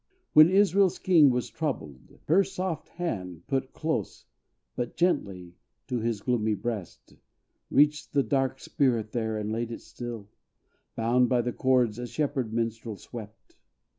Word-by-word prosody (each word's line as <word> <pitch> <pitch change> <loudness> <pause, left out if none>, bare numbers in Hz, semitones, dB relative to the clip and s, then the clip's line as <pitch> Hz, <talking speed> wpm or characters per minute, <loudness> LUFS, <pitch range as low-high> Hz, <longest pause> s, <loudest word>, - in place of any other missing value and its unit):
When 155 +2 +9
Israel's 195 -1 +4
king 165 -6 +5
was 125 -1 0
troubled, 80 - -5
her 185 +6 +5
soft 185 -3 -4
hand 90 - -5
Put 135 -1 -2
close, 160 0 -3 0.5
but 120 -1 -4
gently, 95 - 0 0.3
to 125 0 -2
his 115 -2 -2
gloomy 110 -3 +1
breast, 110 -5 -6 0.5
Reached 150 +1 +3
the 140 -1 +2
dark 135 -1 0
spirit 130 -9 0
there, 110 -2 -2
and 105 0 -3
laid 115 +1 -2
it 115 - -6
still, 120 -4 -7 0.7
Bound 120 +2 +2
by 125 -1 +3
the 120 0 -2
chords 125 -4 +2
a 120 - -4
shepherd 135 -5 -2
minstrel 115 -1 -3
swept. 110 -1 -11
120 Hz, 140 wpm, -27 LUFS, 110-150 Hz, 0.7 s, When